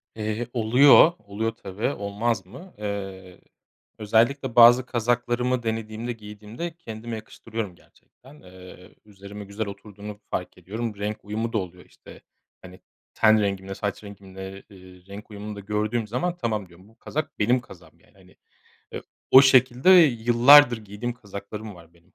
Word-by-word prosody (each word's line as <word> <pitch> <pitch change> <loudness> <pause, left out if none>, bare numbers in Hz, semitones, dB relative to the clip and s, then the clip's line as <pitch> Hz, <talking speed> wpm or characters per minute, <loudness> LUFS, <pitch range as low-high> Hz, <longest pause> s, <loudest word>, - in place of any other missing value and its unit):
Eee, 110 +2 -3
oluyor, 130 +7 +6
oluyor, 110 +2 -4
tabii, 100 +1 -4
olmaz 105 -2 -2
mı? 175 - -13
Eee, 95 -3 -7 0.6
özellikle 115 +4 +1
bazı 120 +1 +7
kazaklarımı 120 +1 -1
denediğimde, 110 +1 -4
giydiğimde 110 +9 -8
kendime 115 -6 -7
yakıştırıyorum 110 -2 -7
gerçekten. 135 - -21
Eee, 90 0 -15
üzerime 100 0 -11
güzel 100 +2 -5
oturduğunu 105 +1 -10
fark 90 0 -4
ediyorum. 105 +5 -5
Renk 105 +1 -5
uyumu 110 +3 -4
da - - +1
oluyor. 90 -2 -6
İşte, - - -16 0.4
hani, 90 0 -13 0.3
ten 110 -1 +4
rengimle, 95 -1 -3
saç 105 +1 -4
rengimle, 95 -1 -10
ııı, 90 -1 -16
renk 105 +2 -11
uyumunu 105 +1 -7
da - - -8
gördüğüm 105 +3 -2
zaman 170 +11 -2
tamam 110 - -3
diyorum, 90 +3 -19
bu 110 - -23
kazak 155 +5 -5
benim 120 +4 +2
kazağım 90 -8 -17
yani. - - -28
Hani, - - -21 0.6
eee, - - -6 0.3
o 130 - +9
şekilde 130 +3 +4
yıllardır 125 -4 +6
giydiğim 110 +3 -6
kazaklarım 105 -1 -9
var 85 -1 -17
benim. 85 +1 -28
105 Hz, 145 wpm, -24 LUFS, 100-120 Hz, 0.6 s, o